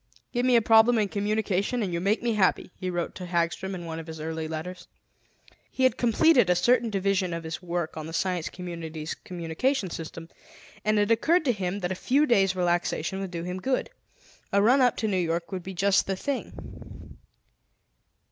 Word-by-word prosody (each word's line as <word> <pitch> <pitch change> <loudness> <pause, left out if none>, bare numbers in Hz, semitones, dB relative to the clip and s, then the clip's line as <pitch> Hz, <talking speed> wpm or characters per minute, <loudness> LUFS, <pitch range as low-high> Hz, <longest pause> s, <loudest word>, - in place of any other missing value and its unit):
"Give 245 0 +1
me 250 - +5
a 230 - +5
problem 225 +2 +6
in 210 -2 +1
communication 210 +2 0
and 185 -3 -3
you 170 - 0
make 205 +5 +1
me 235 -1 +1
happy," 190 -3 +1
he 185 - -4
wrote 175 -1 -2
to 180 - -7
Hagstrom 175 +2 -1
in 175 -2 -7
one 165 -1 -5
of 165 - -9
his 160 -1 -8
early 160 0 -4
letters. 175 +3 -6 0.8
He 260 - -2
had 260 - +4
completed 245 - +4
a 180 - +4
certain 240 +4 +3
division 195 -3 0
of 165 - -5
his 160 +3 -5
work 175 -2 -3
on 155 -1 -6
the - - -7
Science 180 0 -1
Community's 165 -3 -6
communication 180 - -2
system, 165 0 -7 0.5
and 215 0 +2
it 205 +1 +2
occurred 315 +9 +3
to 255 - +4
him 195 -2 -3
that 180 0 -2
a - - +1
few 270 +10 +2
days' 195 -8 +3
relaxation 175 0 0
would 195 -1 -4
do 170 -1 -5
him 180 +1 -4
good. 260 +5 -1 0.6
A 200 - +3
run 245 +7 +5
up 245 -2 +3
to 220 - -1
New 195 -3 0
York 170 0 -1
would 190 -1 -3
be 190 +1 -8
just 200 +2 +2
the 195 - 0
thing. 275 +7 -7
185 Hz, 200 wpm, -27 LUFS, 170-220 Hz, 0.8 s, problem